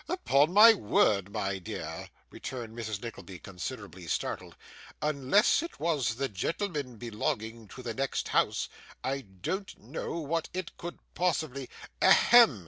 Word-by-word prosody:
'Upon 155 - +3
my 215 +4 +9
word, 100 - +2
my 100 -2 -2
dear,' 90 - -6 0.2
returned 120 -3 -6
Mrs. 110 -3 -4
Nickleby, 100 -5 -7
considerably 90 0 -7
startled, - - -3 0.4
'unless 150 - +3
it 335 - -7
was 145 -9 +1
the 135 +3 -1
gentleman 140 - -3
belonging 110 0 -3
to 130 - -10
the 115 -2 -3
next 135 +3 -2
house, - - +2 0.4
I 135 +1 -1
don't 135 - -5
know 125 +9 -5
what 165 +1 -2
it 185 -2 -4
could 175 0 -7 0.2
possibly 155 -7 -1 0.2
' - - -23
'A - - +7
hem! 235 - +7
130 Hz, 140 wpm, -30 LUFS, 110-165 Hz, 0.4 s, my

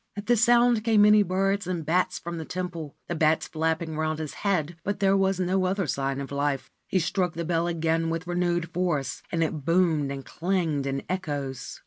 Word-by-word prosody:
At 205 - -5
the 240 - +4
sound 240 -1 +4
came 220 -2 +5
many 210 0 +7
birds 195 0 0
and 175 -4 -3
bats 180 +4 +1
from 170 0 -6
the - - -4
temple, 170 -3 -5
the - - -2
bats 155 -1 +2
flapping 160 0 -1
round 155 0 -1
his 155 -2 -5
head; 175 -5 -1
but 200 0 -2
there 195 -1 +3
was 195 -1 +2
no 185 +1 +1
other 190 +1 0
sign 135 -1 -1
of 140 0 -6
life. 140 -2 -1 0.2
He - - 0
struck 180 0 0
the 170 +1 -4
bell 170 0 0
again 165 -1 0
with 165 +1 -3
renewed 175 -1 -1
force, 165 -7 -1
and 165 -1 +1
it 155 -2 -3
boomed 165 -3 +2
and 135 -1 -6
clanged 165 -6 -1
in 135 0 -2
echoes. 145 -8 -4
170 Hz, 200 wpm, -26 LUFS, 155-185 Hz, 0.2 s, many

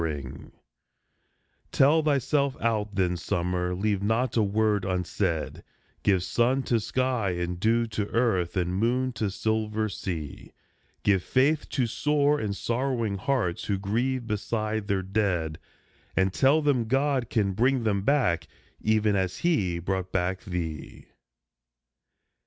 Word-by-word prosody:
80 80 - 0
A 75 -2 -3
SUMMER - - -9
SONG - - -14 1.2
Tell 150 +4 +4
thyself 140 -1 +1
out 110 -3 -1
then, 90 -2 +1
summer, 90 +1 -1
leave 100 +1 0
not 110 +4 0
a 115 - +4
word 105 0 +1
unsaid, 90 -3 -2 0.4
Give 95 -3 +2
sun 125 +7 +1
to 120 -3 +1
sky, 125 -4 0
and 90 0 -3
dew 115 +4 +2
to 110 -2 -3
earth, 100 -8 0
and 90 0 0
moon 125 +6 +1
to 110 -3 -1
silver 110 +2 -1
sea; 85 -6 -6 0.5
Give 100 -3 +3
faith 140 - +1
to 130 - 0
sore 145 +4 +1
and 105 -2 -3
sorrowing 120 -4 -1
hearts 110 -7 -1
who 100 - 0
grieve 120 +6 -1
beside 110 -1 -2
their 100 -2 0
dead, 90 -6 -1 0.6
And 95 0 +2
tell 140 +6 +3
them 135 -5 +2
God 135 -1 +1
can 105 -4 +1
bring 125 +4 +2
them 100 -3 +1
back, 95 - +1 0.3
even 110 -1 +2
as 95 -2 -1
he 100 - +1
brought 95 +1 -3
back 95 0 -1
thee. 85 -6 -5
105 Hz, 140 wpm, -27 LUFS, 95-125 Hz, 1.2 s, Tell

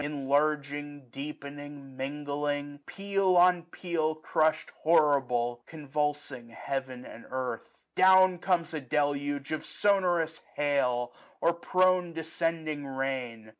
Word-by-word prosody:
Enlarging, 145 0 -1
deepening, 145 0 -8
mingling; 145 +1 -3
peal 195 -2 +1
on 180 0 +6
peal 165 -2 -2
Crushed 155 0 0
horrible, 135 -7 +2
convulsing 145 -4 -3
heaven 130 +1 -5
and 115 - -11
earth. 130 -3 -4 0.2
Down 185 -1 +6
comes 170 -3 0
a 155 - -3
deluge 145 +1 -1
of 155 - -2
sonorous 175 -5 +1 0.2
hail, 125 -4 +1 0.3
Or 170 - +3
prone 185 0 +2
descending 160 -2 -2
rain. 130 -5 -4
145 Hz, 100 wpm, -29 LUFS, 135-165 Hz, 0.3 s, on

